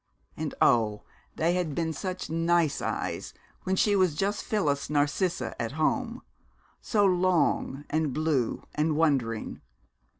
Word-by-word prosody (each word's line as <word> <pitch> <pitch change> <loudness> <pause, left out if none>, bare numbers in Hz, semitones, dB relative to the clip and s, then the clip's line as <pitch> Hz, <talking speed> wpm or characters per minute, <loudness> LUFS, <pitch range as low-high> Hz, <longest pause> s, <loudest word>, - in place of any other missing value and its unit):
And - - -4
oh, 105 -3 +3 0.3
they 165 +2 +1
had 175 -5 -1
been 165 -1 -1
such 185 +5 -4
nice 165 -2 +1
eyes - - -3 0.3
when 190 - +1
she 205 +2 +3
was 185 -6 +3
just 200 +5 -1
Phyllis 150 - 0
Narcissa 150 +5 0
at 115 +2 -3
home, 230 - -1 0.6
so 205 -3 +2
long 180 -6 +1
and 155 -2 0
blue 150 -4 0
and 155 +1 +1
wondering! 135 -8 0
160 Hz, 130 wpm, -28 LUFS, 145-185 Hz, 0.6 s, oh